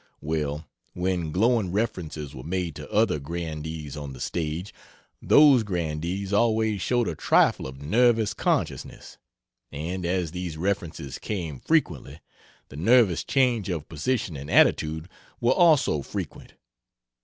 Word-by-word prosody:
Well, 75 0 -3 0.3
when 90 -3 -1
glowing 110 +1 +2
references 80 -8 -3
were 65 - -8
made 85 +2 -3
to 75 -1 -9
other 105 -7 +2
grandees 80 -1 -5
on 70 -2 -6
the 65 - -11
stage, 85 +5 -3 0.5
those 145 -4 +6
grandees 90 0 -3
always 110 -2 +2
showed 120 +1 +1
a - - -1
trifle 75 - +2
of 65 +1 -10
nervous 115 +5 +3
consciousness - - -2 0.5
and 85 +6 -4
as 90 -2 -1
these 90 -3 -5
references 85 -7 -3
came 85 -10 -4
frequently, 85 - 0 0.5
the 65 - -10
nervous 105 0 +4
change 125 -7 +1
of 80 -4 -3
position 85 - -2
and 70 +1 -7
attitude 80 +2 +3 0.3
were 120 +2 +3
also 155 - +4
frequent. - - -7
85 Hz, 130 wpm, -25 LUFS, 75-110 Hz, 0.5 s, those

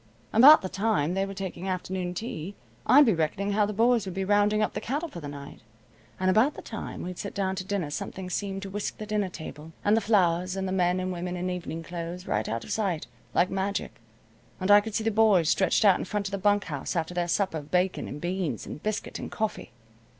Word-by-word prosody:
About 265 +4 +9
the - - -1
time 195 -5 0
they 195 +1 0
were 195 - -6
taking 190 -1 -5
afternoon 185 -1 -3
tea, 195 -3 -5 0.3
I'd 290 +2 +8
be 225 - +4
reckoning 175 +5 -1
how 205 0 +2
the - - -3
boys 230 0 +2
would 185 - -5
be 190 0 -1
rounding 205 +1 +3
up - - -1
the - - -4
cattle 295 +7 -2
for 175 - -8
the 150 - -7
night, 140 0 -9 0.6
and 185 - 0
about 220 +10 +4
the - - -9
time 220 - -6
we'd 180 0 -6
sit 200 - -5
down 190 -1 0
to 185 - -2
dinner 185 -6 -2
something 185 +5 -5
seemed 195 +1 -3
to 195 - -6
whisk 205 +1 -3
the 215 - -6
dinner 210 -2 -1
table, 160 -2 -9
and 205 - +5
the 225 - +2
flowers, 185 -4 +2
and 190 0 -2
the - - -3
men 180 -1 +2
and 185 0 -2
women 180 +1 -4
in 180 +1 -2
evening 170 -2 -5
clothes 175 +1 -6
right 105 +1 -1
out 115 +1 -3
of - - -8
sight, 190 -8 -1 0.3
like 180 - +3
magic, 195 -7 -3 0.6
and 185 +2 +1
I 205 0 +9
could 215 0 -6
see 220 - 0
the 225 - +1
boys 205 -7 +4
stretched 190 +4 +3
out 195 -3 +6
in - - -3
front 205 +1 -2
of - - -7
the 200 - -2
bunk 205 +1 +3
house 145 +1 -4
after 165 +1 -1
their 175 -1 -1
supper 180 -2 0
of 145 0 -12
bacon, 180 +2 0
and 145 - -6
beans, 175 - -2
and 150 - -8
biscuit, 215 0 -3
and - - -6
coffee. 215 - -3
190 Hz, 240 wpm, -27 LUFS, 175-205 Hz, 0.6 s, About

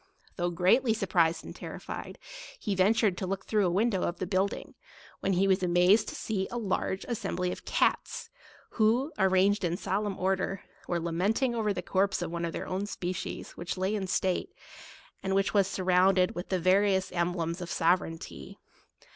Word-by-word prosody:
Though 175 -1 0
greatly 190 +7 +3
surprised 170 -6 +1
and - - -9
terrified, - - -7 0.4
he 205 - -2
ventured 200 0 +3
to 190 - -3
look 195 +1 -3
through 210 -4 +2
a - - +1
window 195 +1 +1
of 175 - -1
the 185 - -3
building, 190 +2 -1 0.5
when 195 - 0
he 190 +2 +3
was 190 0 +3
amazed 180 +4 +4
to - - -7
see 195 -3 -2
a 240 - -4
large 195 -3 -2
assembly 195 -6 -2
of - - -8
cats, 460 - 0 0.4
who, 240 +7 +2
arranged 190 +1 +3
in 175 0 0
solemn 195 +1 -2
order, 190 +1 -1 0.2
were 175 - 0
lament 175 +9 0
ing 250 -2 +2
over 220 -3 0
the 180 -3 -3
corpse 190 0 +1
of 170 - -4
one 170 0 -2
of 165 - -3
their - - -4
own 190 +2 -2
spe 180 -3 -3
cies, - - -6
which 175 +2 -5
lay 190 +3 0
in 200 -3 -2
state, 185 0 0 0.7
and 190 0 -1
was 195 0 +3
surrounded 185 0 +3
with 175 - -6
the 185 - +1
various 190 +1 +3
emblems 170 0 -1
of 175 - -5
sovereignty. 165 - -1
190 Hz, 180 wpm, -29 LUFS, 180-200 Hz, 0.7 s, amazed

